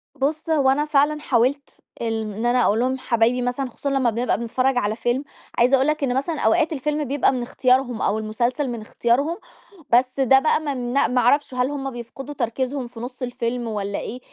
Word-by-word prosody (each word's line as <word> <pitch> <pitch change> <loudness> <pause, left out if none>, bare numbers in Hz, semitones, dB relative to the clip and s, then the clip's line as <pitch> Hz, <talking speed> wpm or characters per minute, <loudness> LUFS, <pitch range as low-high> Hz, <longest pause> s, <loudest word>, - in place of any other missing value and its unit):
بُص 300 +4 -2
هو 290 -4 +3
أنا 290 +3 +2
فعلًا 300 0 +2
حاولت، 275 +1 +1 0.3
ال 225 -1 -1
إن 225 +3 -3
أنا 245 +1 +3
أقول 215 - +2
لهم 260 +2 0
حبايبي 235 0 +1
مثلًا 245 +2 -2
خصوصًا 280 +4 -4
لما 270 -3 +2
بنبقى 235 +3 0
بنتفرج 255 +3 0
على 215 -3 0
فيلم، 240 +4 -1 0.3
عايزة 245 +3 +5
أقول 265 +1 +2
لك 305 -1 0
إن 250 -2 0
مثلًا 300 +3 -2
أوقات 330 -2 +2
الفيلم 300 +1 -1
بيبقى 280 0 +1
من 255 -2 -2
اختيارهم 250 0 +1
أو 210 +2 +1
المسلسل 235 +6 -1
من 235 -2 -5
اختيارهم، 245 +9 0 0.5
بس 255 +2 +2
ده 265 0 +5
بقى 310 +2 +2
ما 295 -2 -3
من 245 -2 -4
ما 250 0 +1
أعرفش، 280 +3 +2
هل 250 +1 0
همَّ 270 -2 -4
بيفقدوا 250 +4 -8
تركيزهم 255 +1 -2
في 240 -1 -12
نُصّ 250 +2 -7
الفيلم، 245 -1 -3
والّا 200 -2 -3
إيه؟ 250 - -6
255 Hz, 200 wpm, -22 LUFS, 240-280 Hz, 0.5 s, عايزة